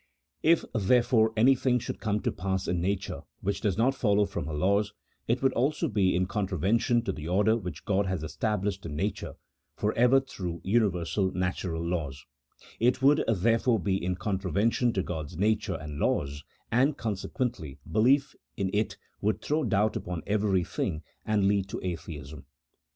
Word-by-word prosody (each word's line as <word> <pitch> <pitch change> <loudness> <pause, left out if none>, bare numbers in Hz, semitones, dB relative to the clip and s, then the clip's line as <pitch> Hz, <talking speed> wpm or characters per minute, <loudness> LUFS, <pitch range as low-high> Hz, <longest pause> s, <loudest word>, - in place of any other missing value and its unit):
If, 165 +1 +4
therefore, 115 +1 +3
any 125 +5 +6
thing 125 -1 +1
should 120 - -5
come 105 -1 -1
to - - 0
pass 95 0 -2
in 90 -1 0
nature 95 +2 -2 0.2
winch 100 +1 -1
does 100 -5 0
not 125 +4 +3
follow 105 -5 +2
from 70 - -4
her 80 - -4
laws, 100 +6 +1 0.3
it 120 +3 0
would 135 - +3
also 150 +7 +1
be 100 - +2
in 90 +1 +2
contravention 105 +5 +1
to - - -1
the 75 +1 -7
order 105 +5 +3
which 90 -6 -6
God 100 -2 +1
has 95 -4 -2
established 100 +2 -2
in 75 - -5
nature - - -3 0.4
for 105 +1 0
ever 125 +3 +5
through 90 -10 -6
universal 95 -3 +1
natural 90 -2 -2
laws: 75 -6 -3 0.5
it 125 +3 +2
would, 145 +2 +5
therefore, 115 +3 +2
be 95 0 -1
in 90 0 0
contraven 100 +2 0
tion 120 -2 +2
to 95 - 0
God's 80 -2 -5
nature 105 -1 +1
and 75 -2 -7
laws, 70 +1 0 0.3
and, 135 +5 +3
consequently, 105 - -3
belief 135 +6 +3 0.2
in 95 -3 -1
it 105 +1 0 0.2
would 105 +1 +1
throw 155 +1 0
doubt 105 -2 +1
upon 90 -2 -4
everything, 95 -5 0 0.2
and 105 -2 +2
lead 100 -1 +1
to - - -4
Atheism. 80 -4 -6
100 Hz, 165 wpm, -28 LUFS, 90-115 Hz, 0.5 s, any